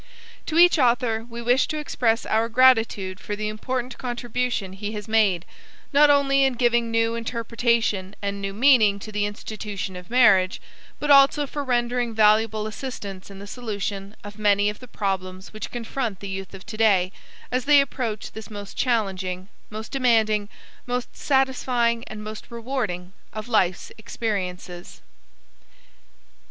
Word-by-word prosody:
To 320 - -1
each 350 -1 +6
author 235 -3 +2
we 235 0 -7
wish 245 +3 +3
to 310 - -3
express 235 -6 0
our 225 +1 +1
gratitude 225 -6 +3
for 205 - -4
the 215 +1 -3
important 250 +4 -4
contribution 240 -4 -2
he 205 +2 -5
has 210 0 -6
made, 210 -6 +2 0.5
not 295 +1 +6
only 275 -1 +4
in 265 -1 +3
giving 240 -1 +2
new 230 0 +1
interpretation 230 -4 -1
and 200 0 -3
new 195 0 -3
meaning 220 -2 +4
to 215 +2 -9
the 205 0 0
institution 205 -2 -6
of 180 -1 -10
marriage, 210 -5 +4 0.4
but 295 0 0
also 280 +1 +6
for 290 +1 -5
rendering 240 -2 0
valuable 215 0 +3
assistance 210 -5 -7
in 195 - -11
the 200 - -9
solution 205 -3 -5
of 205 +1 -10
many 205 0 +3
of 210 - -13
the 250 - -12
problems 190 -3 -4
which 215 -1 -6
confront 235 -3 -4
the 200 - -7
Youth 190 0 -6
of 190 - -12
today 205 -4 +2 0.4
as 255 0 -1
they 290 0 +7
approach 245 -6 -2
this 220 +1 -9
most 205 -2 -8
challenging, 190 -6 -1 0.2
most 215 0 -7
demanding, 220 -6 +2 0.4
most 245 0 -3
satisfying 250 -4 +1
and 215 -1 -8
most 215 0 -8
rewarding 225 -7 -4 0.2
of 215 +1 -6
Life's 185 -6 +1
experiences. 185 -5 -5
220 Hz, 150 wpm, -24 LUFS, 200-245 Hz, 0.5 s, they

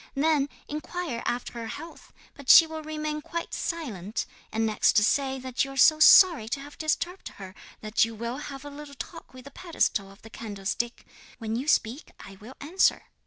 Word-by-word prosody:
Then 290 0 +2 0.2
inquire 305 -4 -5
after 245 +1 -3
her 230 -1 -6
health, 325 +9 -10 0.2
but 280 -3 -11
she 330 - +10
will 320 0 -7
remain 305 0 -4
quite 335 +2 -6
silent; 225 - -4 0.3
and 225 +1 0
next 215 0 +2
say 265 +5 +2
that 255 -1 -2
you 275 0 -6
are - - -10
sorry 310 - +7
to 275 - -2
have 285 +1 -11
disturbed 340 +4 -2
her, 195 -2 -8
and 185 - -19 0.4
that - - +5
you 225 0 -2
will 235 +3 -4
have 285 -1 -8
a 290 - -8
little 285 0 -10
talk - - -9
with 255 0 -13
the 280 - -11
pedestal 275 - -1
of 195 - -19
the 225 - -13
candlestick. 220 +2 -4 0.3
When 225 -2 -4
you 260 +5 -3
speak 250 +1 0
I 195 - -11
will 225 +7 -13
answer.' 340 +7 +1
270 Hz, 190 wpm, -27 LUFS, 225-310 Hz, 0.4 s, she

